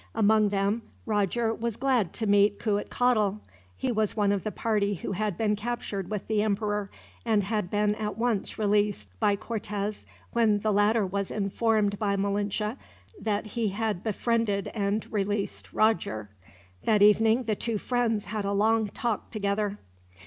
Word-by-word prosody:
Among 215 -1 +4
them, 200 +3 0 0.2
Roger 220 +2 +1
was 230 -1 -3
glad 250 -9 +1
to 225 - -3
meet 205 0 +4
Cuitcatl. 210 0 +1 0.4
He 260 - -1
was 220 -1 0
one 205 -1 +3
of 200 -2 0
the 215 - -2
party 205 -3 0
who 185 - -5
had 200 -1 -1
been 210 -2 +1
captured 210 -4 -4
with 210 -2 -3
the 215 -1 +1
emperor; 210 -1 -1 0.3
and 220 -3 +2
had 210 -2 -1
been 210 +1 +2
at 210 -1 -4
once 230 -4 -1
released, 205 - +1
by 205 - +3
Cortez, 210 -1 -4 0.3
when 220 -3 +3
the 215 0 +1
latter 205 +1 +3
was 200 +1 -2
informed 205 0 +1
by 200 -2 +1
Malinche 205 +3 -1 0.4
that 210 -1 -1
he 220 +1 -2
had 210 -2 -2
befriended 220 -2 0
and 205 0 -1
released 205 0 -2
Roger. 110 - +1 0.5
That 210 -2 +4
evening, 220 +4 +5
the 220 -2 0
two 230 +1 -2
friends 230 -2 0
had 210 0 -3
a 200 0 -1
long 220 +2 +3
talk 230 -1 -3
together. 205 -1 -1
210 Hz, 155 wpm, -27 LUFS, 200-220 Hz, 0.5 s, evening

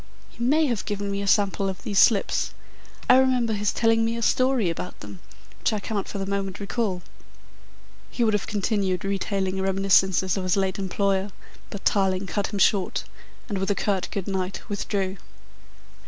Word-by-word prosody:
He 235 - -7
may 305 +6 +3
have 235 -7 -1
given 200 -1 -2
me 200 0 -2
a 200 - -3
sample 195 -1 +2
of 190 - -7
these 200 -2 +1
slips. 210 -5 +3 0.5
I 255 - +7
remember 255 -4 +3
his 205 0 0
telling 225 -1 +2
me 230 +1 -1
a 230 - -3
story 255 -3 +2
about 170 +2 -4
them, 100 -3 -10 0.4
which - - 0
I 215 - -1
cannot 205 -1 -3
for - - -5
the 195 - -3
moment 195 -1 -3
recall." 200 -2 -2 1.1
He 240 - -1
would 220 -2 +3
have 210 - -1
continued 200 -3 -1
retailing 195 -1 -1
reminiscences 190 -1 +3
of 190 - -2
his 185 +1 +1
late 190 0 0
employer, 195 +1 0 0.4
but 200 - -8
Tarling 190 -1 +2
cut 200 +2 -2
him 205 - -5
short, 195 -1 +2 0.4
and 205 -4 -2
with 195 - -1
a 205 - +2
curt 195 -3 0
good 195 -3 -4
night 190 -1 -3
withdrew. 195 -1 -2
200 Hz, 180 wpm, -25 LUFS, 190-215 Hz, 1.1 s, I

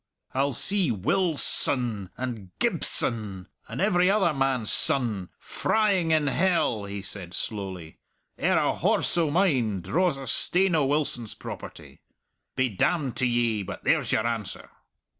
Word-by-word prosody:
"I'll 140 +2 +1
see 190 - +2
Wil 160 - 0
son... 115 -9 +1
and 120 -7 -5
Gib - - 0
son... 100 -5 -1 0.2
and - - -6
every 180 -2 +3
other 195 -5 +3
man's 135 -5 0
son... 110 -9 +1
frying 200 -6 0
in 155 -2 +3
hell," 145 - +1
he 100 -1 -6
said 95 -3 -7
slowly, 95 -6 -5 0.4
"ere - - +1
a - - +2
horse - - +1
o' 160 -3 +2
mine 135 - +1
draws 170 - +1
a 135 - -7
stane 185 +6 +2
o' 150 -4 +2
Wilson's 135 -6 -1
property. - - -10 0.5
Be 130 - +2
damned 130 - 0
to 130 - +2
ye, 120 -3 +1
but 95 - -7
there's - - +1
your 110 - +1
answer!" 115 -4 -4
130 Hz, 145 wpm, -26 LUFS, 105-165 Hz, 0.5 s, every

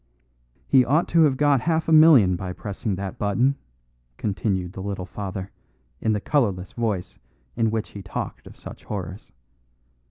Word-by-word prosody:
"He 130 -2 +5
ought 150 +7 +2
to 165 - +4
have 135 -3 +1
got 145 -3 +3
half 160 +2 0
a - - 0
million 155 - +7
by 90 +1 -5
pressing 100 +1 -4
that 95 0 -6
button," 120 +7 +2 0.6
continued 95 -2 -2
the 95 - -7
little 95 -2 -4
father, 95 0 -6 0.5
in 110 - +1
the 105 - 0
colourless 100 -8 0
voice 105 -6 -3 0.4
in 115 -1 +1
which 110 0 -2
he 100 - -9
talked 95 - -6
of - - -13
such - - -11
horrors. 95 -1 -6
105 Hz, 160 wpm, -24 LUFS, 95-130 Hz, 0.6 s, million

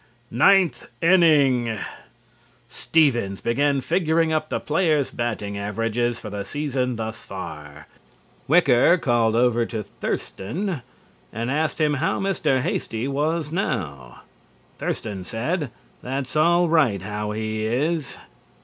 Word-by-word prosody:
NINTH 175 +1 +3
INNING: 140 -10 +4 0.9
Stevens 120 -12 +1
began 140 +3 +1
figuring 165 +1 +1
up 155 0 -1
the - - -1
players' 155 -3 +1
batting 105 -4 -3
averages 115 +3 -1
for 105 - -8
the 100 -1 -4
season 130 0 -2
thus 110 0 -5
far. 75 -6 -8 0.6
Wicker 155 0 +5
called 120 -7 +2
over 120 0 +3
to 110 -2 -4
Thurston 165 - -4 0.5
and 115 +3 -3
asked 155 +1 -1
him 150 -1 +2
how 150 +4 0
Mr. 190 -9 +1
Hasty 125 -5 -2
was 150 +2 -1
now. 85 - -3 0.6
Thurston 100 -4 -4
said 140 - -2 0.3
"That's 130 +1 -4
all 170 +3 +4
right 135 - +2
how 105 +1 -4
he 110 0 -3
is." 150 +6 -1
130 Hz, 115 wpm, -23 LUFS, 110-155 Hz, 0.9 s, Wicker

